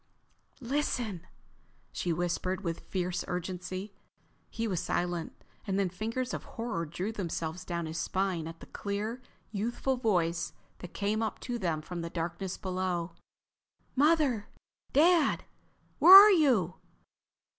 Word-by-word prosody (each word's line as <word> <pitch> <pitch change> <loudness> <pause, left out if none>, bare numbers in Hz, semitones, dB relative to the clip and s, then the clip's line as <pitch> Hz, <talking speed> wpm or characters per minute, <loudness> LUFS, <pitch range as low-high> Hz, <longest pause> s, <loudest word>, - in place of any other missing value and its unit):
"Listen!" 240 - -2 0.6
she 175 - -2
whispered 175 +2 -1
with 165 -2 -2
fierce 180 -1 -3
urgency. 185 +2 -4 0.6
He 230 0 -3
was 185 -5 -1
silent. 175 -1 -2 0.2
And 195 -1 0
then 195 -2 +1
fingers 225 +7 -3
of - - -4
horror 225 -8 -4
drew 180 +7 -3
themselves 175 -4 -4
down 170 -2 -3
his 160 +1 -4
spine 185 -4 -1
at 165 0 -9
the - - -9
clear, 210 +5 -4 0.3
youthful 240 +5 -1
voice 175 -7 0 0.3
that 180 - -10
came 210 +2 0
up 220 -2 -2
to 245 -1 -3
them 165 -6 -1
from 175 +1 -5
the 170 - -4
darkness 175 +3 -4
below. 185 -2 -2 0.8
"Mother?... 285 -6 +3 0.4
Dad?... 325 0 +4 0.5
Where 370 - +11
are 410 +2 +12
you?" 245 - +3
190 Hz, 130 wpm, -30 LUFS, 175-230 Hz, 0.8 s, are